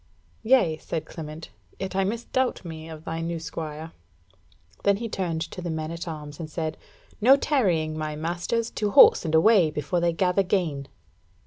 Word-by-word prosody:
"Yea," 220 Hz, -10 st, +3 dB
said 160 Hz, 0 st, -4 dB
Clement; 155 Hz, -, -8 dB, 0.3 s
"yet 190 Hz, -1 st, -5 dB
I 195 Hz, -, +2 dB
misdoubt 235 Hz, +2 st, -1 dB
me 160 Hz, -1 st, -8 dB
of 160 Hz, -1 st, -10 dB
thy 165 Hz, 0 st, -3 dB
new 165 Hz, 0 st, -3 dB
squire." 160 Hz, 0 st, -6 dB, 0.9 s
Then 200 Hz, -1 st, +3 dB
he 230 Hz, +2 st, -4 dB
turned 175 Hz, -6 st, -2 dB
to 180 Hz, -, -8 dB
the 175 Hz, -, -4 dB
men 160 Hz, 0 st, -3 dB
at 170 Hz, +1 st, -6 dB
arms 150 Hz, -2 st, -7 dB
and 160 Hz, -2 st, -6 dB
said: 155 Hz, 0 st, -3 dB, 0.5 s
"No 255 Hz, +5 st, +8 dB
tarrying, 180 Hz, -, +1 dB
my 155 Hz, -1 st, -3 dB
masters! 175 Hz, +9 st, -2 dB
To 210 Hz, -, -1 dB
horse 200 Hz, -, +7 dB
and 160 Hz, 0 st, +1 dB
away 180 Hz, 0 st, +5 dB
before 150 Hz, +3 st, -2 dB
they 170 Hz, 0 st, +2 dB
gather 180 Hz, +3 st, +2 dB
gain!" 170 Hz, -8 st, -1 dB
165 Hz, 175 wpm, -25 LUFS, 155-195 Hz, 0.9 s, No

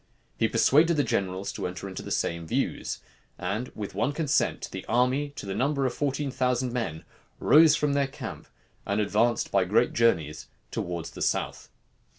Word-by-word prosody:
He -, -, +4 dB
persuaded 160 Hz, +4 st, +4 dB
the 145 Hz, -, +3 dB
generals 95 Hz, -3 st, -1 dB
to -, -, -3 dB
enter 90 Hz, +2 st, -6 dB
into 95 Hz, -, -6 dB
the -, -, -8 dB
same 85 Hz, -1 st, -1 dB
views; -, -, -2 dB, 0.4 s
and 100 Hz, +7 st, -2 dB
with 105 Hz, -2 st, -5 dB
one 145 Hz, -, 0 dB
consent 150 Hz, -2 st, 0 dB
the -, -, -6 dB
army, 130 Hz, +4 st, +2 dB
to -, -, -7 dB
the 95 Hz, -, -3 dB
number 140 Hz, +4 st, +1 dB
of 125 Hz, -, 0 dB
fourteen 140 Hz, 0 st, -1 dB
thousand 125 Hz, -1 st, 0 dB
men, 115 Hz, -11 st, -3 dB, 0.3 s
rose 155 Hz, 0 st, +6 dB
from 150 Hz, -1 st, +1 dB
their 140 Hz, -1 st, +2 dB
camp, 135 Hz, -, -8 dB, 0.4 s
and 100 Hz, +1 st, -1 dB
advanced 110 Hz, +3 st, +1 dB
by 100 Hz, -1 st, +4 dB
great 105 Hz, +6 st, +2 dB
journeys 80 Hz, -10 st, +1 dB, 0.2 s
towards 85 Hz, -2 st, -4 dB
the -, -, -10 dB
south. -, -, -1 dB
120 Hz, 170 wpm, -27 LUFS, 95-140 Hz, 0.4 s, rose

